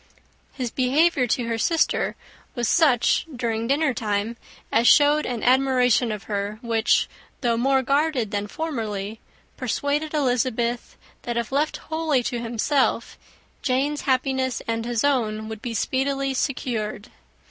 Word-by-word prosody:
His 250 -4 -4
behaviour 270 +1 +2
to 240 +1 0
her 230 -1 -2
sister 325 +8 +1 0.4
was 240 -3 -1
such 280 -5 +3
during 230 -1 -2
dinnertime 235 -7 0 0.4
as 230 +2 +3
showed 295 +4 +5
an 240 -3 -3
admiration 250 -2 +3
of 210 -2 -5
her, 205 0 -3
which, 230 -1 +2 0.3
though 240 -3 +2
more 265 +3 +2
guarded 275 -5 +1
than 205 0 -2
formerly, 220 -8 -4 0.4
persuaded 285 +5 -1
Elizabeth, 245 -3 0 0.2
that, 240 -1 -3
if 235 0 -2
left 295 +3 0
wholly 315 -5 -1
to 240 0 -2
himself, 240 +4 0 0.5
Jane's 275 +3 0
happiness, 260 -1 0
and 230 0 -2
his 240 -2 -1
own, 220 -6 0
would 220 -1 -7
be 235 -2 -4
speedily 275 +4 0
secured. 235 -6 -3
250 Hz, 130 wpm, -24 LUFS, 225-275 Hz, 0.5 s, showed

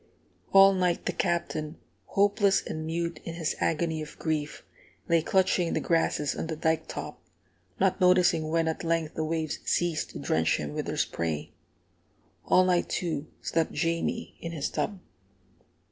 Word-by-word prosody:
All 195 0 +8
night 180 -2 0
the - - +1
Captain, 160 -2 -2 0.3
hopeless 200 0 +3
and 155 0 -4
mute 170 +1 -2
in 165 - -6
his 165 -2 -1
agony 160 -1 0
of 155 - -9
grief, 155 -2 -2 0.4
lay 170 -1 +4
clutching 185 0 +2
the - - +1
grasses 165 -3 +1
on - - -3
the 160 - -3
dike 160 +1 0
top, - - -7 0.6
not 190 -1 +2
noticing 180 -3 +4
when 165 0 +1
at 160 - -2
length 165 -2 0
the 160 - -2
waves 160 -1 -2
ceased 170 -3 0
to - - -8
drench 80 +3 +1
him 75 -1 -5
with - - -3
their - - -3
spray. 80 -3 -2 0.9
All 185 - +5
night, 180 -1 +2
too, 160 -4 -2
slept 165 -1 0
Jamie 165 -1 -1
in 165 0 -5
his 145 -4 -2
tub. 205 -2 -2
165 Hz, 160 wpm, -28 LUFS, 155-175 Hz, 0.9 s, All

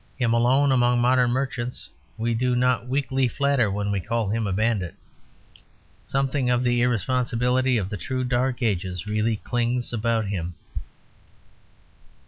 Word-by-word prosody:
Him 120 -3 +1
alone 130 +4 +3
among 120 -1 +3
modern 125 0 +3
merchants 125 -1 -2 0.3
we 115 +1 -1
do 125 +2 +1
not 125 0 +1
weakly 135 0 0
flatter 140 -3 +1
when 100 +1 -2
we 100 - 0
call 115 +2 -2
him 110 0 -1
a - - -2
bandit. 100 -3 0 1.1
Something 135 -1 0
of 125 0 +2
the 120 -1 +2
irresponsibility 125 +1 +1
of 100 -4 -1
the 105 - -5
true 130 +9 -3
dark 125 0 0
ages 95 -4 -1
really 110 +1 0
clings 120 +2 -1
about 115 -1 0
him. 90 -4 -4
120 Hz, 140 wpm, -24 LUFS, 110-125 Hz, 1.1 s, alone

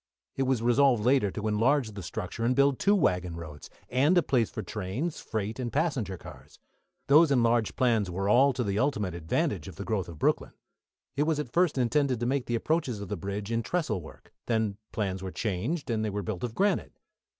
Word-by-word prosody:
It 135 -1 0
was 125 -4 +1
resolved 120 -2 +4
later 125 -5 +4
to 105 +3 -4
enlarge 115 +3 +2
the 100 -1 -7
structure 95 +4 -5
and 125 +2 +2
build 140 -1 +3
two 200 +1 +4
waggon 90 - +1
roads, 80 -3 -9 0.2
and 145 +8 +3
a 175 - +5
place 120 -5 +1
for - - -5
trains, 110 - -4
freight, 110 +2 -4
and 120 -2 -3
passenger 135 - -1
cars. - - -13 0.5
Those 150 +3 +6
enlarged 120 -4 +2
plans 115 -6 +2
were 95 +3 -2
all 130 +7 +5
to 125 0 -1
the 100 -1 -1
ultimate 105 - 0
advantage 85 -2 -1
of - - -9
the - - -6
growth 100 -6 -2
of 85 - -9
Brooklyn. - - 0 0.6
It 145 +2 +1
was 160 -2 +1
at 130 -5 -5
first 175 -3 +2
intended 130 0 +1
to 120 - -1
make 130 +1 0
the 120 - 0
approaches 130 -3 -1
of 100 -2 -7
the 105 - -2
bridge 100 +4 -5
in 115 0 +1
trestle 130 - -1
work, 80 - -14
then 110 -4 0
plans 95 -3 -2
were 95 - -4
changed 115 - -2
and 110 -1 0
they 110 - -1
were 105 0 -3
built 95 -1 -4
of 120 -2 -3
granite. 200 +2 +1
115 Hz, 210 wpm, -28 LUFS, 100-140 Hz, 0.6 s, Those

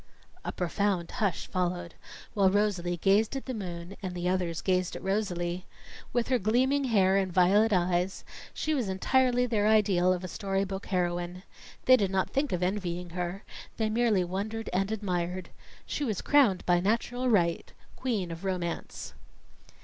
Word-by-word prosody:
A - - -3
profound 180 0 -1
hush 205 -7 -1
followed, 175 -2 -2 0.4
while 195 -3 +4
Rosalie 185 -3 0
gazed 205 +7 +2
at 270 - -4
the 260 - -4
moon 180 -3 -6
and 185 -2 -4
the 175 0 -2
others 180 -3 -1
gazed 185 -2 0
at - - -7
Rosalie. 185 -3 -2 0.4
With 240 0 0
her 255 -2 +3
gleaming 260 +7 +2
hair 195 -5 +3
and 190 -2 0
violet 195 +5 +4
eyes, 180 0 +1 0.3
she 310 - -2
was 250 -9 -1
entirely 250 +5 +2
their 215 -4 +1
ideal 195 -4 +4
of 185 0 -1
a - - -3
storybook 195 +1 -3
heroine. 175 0 -2 0.4
They 255 0 +7
did 200 -4 +1
not 190 0 0
think 280 +1 0
of 180 0 -1
envying 180 -2 -2
her; 180 +3 -4 0.3
they 220 -1 0
merely 220 -4 +2
wondered 205 +5 -4
and 195 +3 0
admired. 180 -4 -2 0.4
She 295 - -3
was 215 -9 -2
crowned 255 -11 +4
by 175 -1 +4
natural 235 +6 0
right, 170 -7 +1 0.2
Queen 215 -9 -2
of 165 +2 -7
Romance. 180 -3 -4
190 Hz, 160 wpm, -29 LUFS, 180-220 Hz, 0.4 s, They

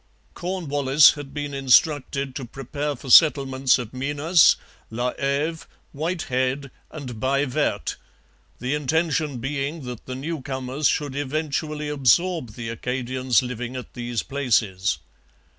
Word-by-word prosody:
Cornwallis 150 -6 +3
had 145 -2 -8
been 145 0 -4
instructed 135 0 +2
to 135 - -4
prepare 140 +4 -4
for 130 0 -6
settlements 135 -3 +6
at 120 -1 -7
Minas, 145 +6 +4 0.3
La 120 +2 -2
Heve, 145 +4 -1 0.2
Whitehead, 140 -4 -2 0.2
and 130 -7 -8
Baie 140 +3 +1
Verte, 125 - -1 0.6
the 125 +3 -2
intention 150 -1 0
being 140 +4 -3
that 125 -2 -8
the 130 - -4
newcomers 135 -1 -2
should 145 -3 -1
eventually 150 +1 -2
absorb 150 -1 +2
the 115 -1 -6
Acadians 125 +1 0
living 125 0 -5
at 125 - -7
these 120 -2 -3
places. 110 - 0
135 Hz, 120 wpm, -24 LUFS, 125-150 Hz, 0.6 s, settlements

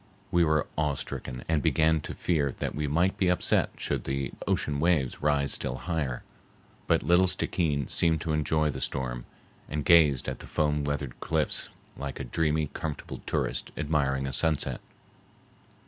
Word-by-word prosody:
We 85 0 +4
were 75 -2 +2
awe 75 -2 +1
stricken 60 -1 -6
and 80 -2 +1
began 80 +2 +3
to - - -7
fear 75 -6 0
that - - -3
we 75 0 -2
might 85 +6 +1
be 95 - +2
upset 90 - +2
should - - -2
the 70 0 -2 0.2
ocean 70 -1 0
waves 75 -5 +1
rise 70 -2 +2
still - - -2
higher. 75 -3 -3 0.6
But - - +3
little 90 +2 +4
Stickeen 80 -6 +1
seemed 80 -2 +3
to 80 - -1
enjoy 75 0 +1
the - - -6
storm, - - -3 0.4
and 75 -2 -3
gazed 75 -6 +5
at 65 - -3
the - - -10
foam 75 -1 0
wreathed 70 -3 -3
cliffs 80 -3 0 0.3
like 70 -1 -6
a - - -3
dreamy, 80 -2 0
comfortable 80 -3 -5
tourist - - -1
admiring 70 -3 0
a 65 - -3
sunset. 80 +1 +2
75 Hz, 165 wpm, -28 LUFS, 70-80 Hz, 0.6 s, gazed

